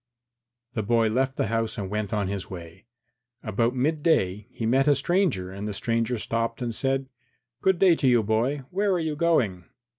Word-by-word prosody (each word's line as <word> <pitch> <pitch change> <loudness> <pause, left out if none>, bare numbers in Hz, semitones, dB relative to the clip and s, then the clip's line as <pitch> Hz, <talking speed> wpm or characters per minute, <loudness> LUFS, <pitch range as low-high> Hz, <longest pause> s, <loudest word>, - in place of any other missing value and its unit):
III 120 0 -62
The 100 - -8
boy 115 -1 +3
left 130 +4 0
the - - +1
house 115 +2 -1
and 100 -2 -4
set 105 0 -1
out 100 - -14
on 105 -2 0
his 95 -2 -4
way. 85 +2 -10 0.6
About 115 +3 0
midday 130 - +1
he 115 - -5
met 135 +5 +3
a 145 - +5
stranger 140 - 0
and 100 +2 -5
the 105 - -4
stranger 115 +3 0
stopped 115 +1 -2
and 120 -2 -3
said, 135 +2 -1 0.5
"Good 190 -1 +3
day 180 -1 +5
to 135 - +1
you, 120 -3 +4
boy. 120 +7 0
Where 200 +2 +1
are 180 - +1
you 160 -2 -2
going?" 125 - +1
120 Hz, 200 wpm, -26 LUFS, 105-135 Hz, 0.6 s, a